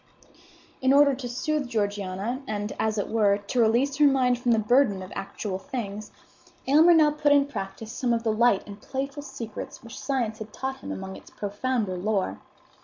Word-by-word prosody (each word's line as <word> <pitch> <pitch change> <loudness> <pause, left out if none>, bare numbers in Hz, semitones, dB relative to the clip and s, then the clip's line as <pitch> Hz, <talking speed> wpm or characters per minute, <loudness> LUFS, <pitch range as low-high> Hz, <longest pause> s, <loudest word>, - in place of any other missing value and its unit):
In 260 +1 +4
order 285 0 +6
to 255 -2 -5
soothe 280 +3 -1
Georgiana, 205 +1 -2
and, 210 0 -3
as 220 0 0
it 205 - -1
were, 205 -3 +3
to 205 +5 -3
release 240 +5 +3
her 295 -1 +6
mind 255 -3 +3
from 245 -1 +1
the 225 - +4
burden 220 -3 +3
of 185 - -10
actual 195 0 -4
things, 215 -5 -5 0.6
Aylmer 315 +6 +6
now 305 -2 +5
put 295 0 +1
in 285 -1 +5
practice 215 -4 -6
some 245 -1 -1
of 230 -1 +1
the 220 -2 +1
light 230 -2 +3
and 205 0 -10
playful 275 +2 -4
secrets 245 -6 -8
which 230 0 -9
science 240 -5 -2
had 220 -1 -8
taught 265 +3 -4
him - - -8
among 190 0 -6
its - - -15
profounder 205 -1 -2
lore. 190 - -1
235 Hz, 185 wpm, -26 LUFS, 205-270 Hz, 0.6 s, order